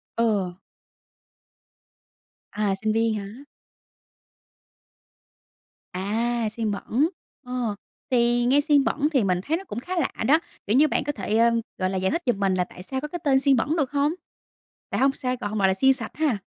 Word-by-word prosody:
Ừ. 200 -6 0 1.9
À, 205 -2 0
sinh 215 0 +1
viên 225 0 +2
hả? 210 +6 -7 2.5
À, 225 +5 -1
xiên 220 -1 -2
bẩn, 250 - 0 0.4
ờ. 245 -4 -2 0.4
Thì 240 0 +3
nghe 280 +4 +4
xiên 290 -1 +4
bẩn 295 +2 +1
thì 260 -7 +3
mình 180 -2 +1
thấy 320 +3 0
nó 385 - -8
cũng 235 - -6
khá 360 +9 -5
lạ - - 0 0.2
đó! 310 +4 +6 0.3
Kiểu 210 - +2
như 305 +3 +6
bạn - - 0
có 290 - -1
thể, 215 -2 -2
ờ, 235 +1 +5 0.3
gọi 185 0 0
là, 190 - -2
giải 190 0 0
thích 340 - -1
giùm 240 -5 +1
mình 195 -1 +2
là 180 - +2
tại 180 0 -11
sao 265 +6 -4
có 300 - -4
cái 350 +3 -6
tên 270 -2 +4
"xiên 275 -1 +4
bẩn" 285 +7 0
được 285 -3 0
hông? 290 +2 +1 0.8
Tại - - -2
hông 270 +1 +5
sao 255 -3 -2
gọi 205 - -3
hông 215 0 -3
gọi 195 - +4
là 190 - +3
"xiên 265 +7 +4
sạch" - - -6
ha. 290 -8 +1
240 Hz, 195 wpm, -25 LUFS, 205-280 Hz, 2.5 s, đó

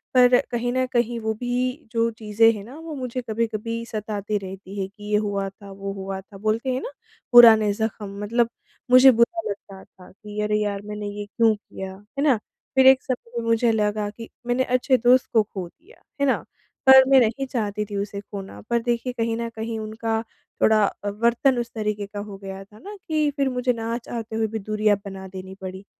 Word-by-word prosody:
पर 250 0 +7
कहीं 245 +1 -1
न 255 0 +1
कहीं 240 0 +1
वो 220 0 -1
भी 250 +3 -2
जो 230 0 +2
चीज़ें 225 +1 +4
हैं 205 - -7
ना 255 - -11
वो 325 -1 -7
मुझे 255 -1 -4
कभी-कभी 230 +1 -2
सताती 210 -1 -3
रहती 195 +1 -8
है 190 - -2
कि 205 +1 -16
ये 210 - +4
हुआ 200 -2 -1
था, 195 0 -14
वो 195 0 -5
हुआ 195 0 -5
था 195 +1 -15
बोलते 220 +5 -1
हैं 255 - -2
ना - - -5 0.4
पुराने 220 -3 +8
ज़ख्म 205 -2 -4
मतलब 235 +2 +1 0.4
मुझे 255 +1 +9
बुरा 240 +9 +2
लगता 195 -1 -8
था 180 - -18
कि 210 +1 -9
अरे 210 0 +1
यार 200 -1 -2
मैंने 210 0 -5
ये 205 - -4
क्यों 225 +1 +3
किया 190 -2 -8
है 210 +8 -6
ना? 275 -5 +5 0.4
फिर 265 0 +6
एक 265 -1 +7
समय 245 -2 -4
में 230 - -4
मुझे 230 0 +3
लगा 210 -1 0
कि 230 +2 -10 0.2
मैंने 245 +1 +2
अच्छे 255 +1 +2
दोस्त 250 +2 +4
को 220 -2 +5
खो 190 -4 -7
दिया, 355 - -22 0.2
है - - +4
ना, 265 - +3 0.5
पर 265 0 +10
मैं 270 - +7
नहीं 240 +4 0
चाहती 210 -4 -2
थी 205 - -7
उसे 200 0 -3
खोना 195 -1 -9
पर 235 0 +2
देखिए 240 +1 -1
कहीं 230 0 0
न 235 0 -3
कहीं 225 0 -4
उनका 220 +1 -2 0.4
थोड़ा 215 -1 +5
अ, 205 +1 -4
वर्तन 235 +5 +2
उस 235 -1 -4
तरीके 210 -1 -2
का 205 0 -7
हो 205 -1 -7
गया 195 0 -7
था 210 +2 -18
ना 410 +1 -9
कि 305 -2 +1
फिर 275 -1 +2
मुझे 250 0 0
ना 230 0 -3
चाहते 240 0 -7
आते 220 -1 -7
हुए 220 0 +1
भी 220 +1 -4
दूरियाँ 215 0 +1
बना 190 -1 -7
देनी 190 0 -9
पड़ी। 190 +1 -7
220 Hz, 210 wpm, -24 LUFS, 205-240 Hz, 0.5 s, पर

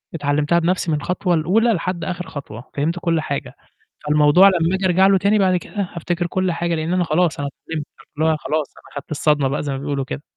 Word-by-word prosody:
اتعلمتها 145 +2 +1
بنفسي 170 0 0
من 150 - +1
الخطوة 180 +4 -1
الأولى، 210 +9 +2
لحد 180 -1 -3
آخِر 180 -1 -4
خطوة، 125 -4 -9
فهمت 160 +5 -1
كلّ 165 -2 0
حاجة، 140 -4 -4 0.5
فالموضوع 150 +5 +6
لمّا 175 -1 +2
أجي 190 0 -2
أرجع 185 +1 +4
له 195 0 +5
تاني 200 +3 +2
بَعد 185 -2 +3
كده، 195 +1 -4
هافتكر 175 +1 -2
كلّ 185 +1 0
حاجة، 170 0 -1
لإن 160 +2 -2
أنا 180 -1 +2
خلاص 165 0 +1
أنا 140 0 -2 0.2
اتعلمت. 155 -3 -4 0.3
اللي 155 - +1
هو 155 - 0
خلاص 155 -1 -3
أنا - - -18
خَدت 140 - -8
الصدمة 150 -2 +2
بقى، 140 +3 -2
زَي 145 - -3
ما - - -3
بيقولوا 140 -1 -2
كده. 145 +1 -6
165 Hz, 220 wpm, -20 LUFS, 150-180 Hz, 0.5 s, فالموضوع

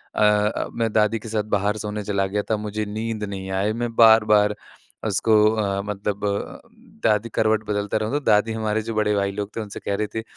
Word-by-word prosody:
अ, 105 0 +2
मैं 115 -1 -1
दादी 110 +1 +2
के 110 - -9
साथ 110 -1 -1
बाहर 105 +2 -1
सोने 105 0 -4
चला 100 -1 0
गया 105 0 0
था, 110 - +2
मुझे 105 +1 -3
नींद 110 +1 -4
नहीं 95 -2 -5
आई 105 +2 0
मैं 115 -1 -3
बार-बार 105 -2 +5 0.5
उसको 110 +2 +1 0.2
अ, 100 -2 -1
मतलब 105 0 -3
अ, 100 0 -4 0.5
दादी 105 +2 +1
करवट 110 -1 +2
बदलता 105 0 -1
रहूँ, 110 +3 -2
तो 145 - +1
दादी 105 +2 +3
हमारे 110 0 0
जो - - -2
बड़े 105 -1 +1
भाई 100 -1 0
लोग 100 0 -5
थे 115 - -1
उनसे 105 -2 -7
कह 100 - -2
रहीं 105 +1 -1
थीं 110 - -2
105 Hz, 210 wpm, -23 LUFS, 105-110 Hz, 0.5 s, बार-बार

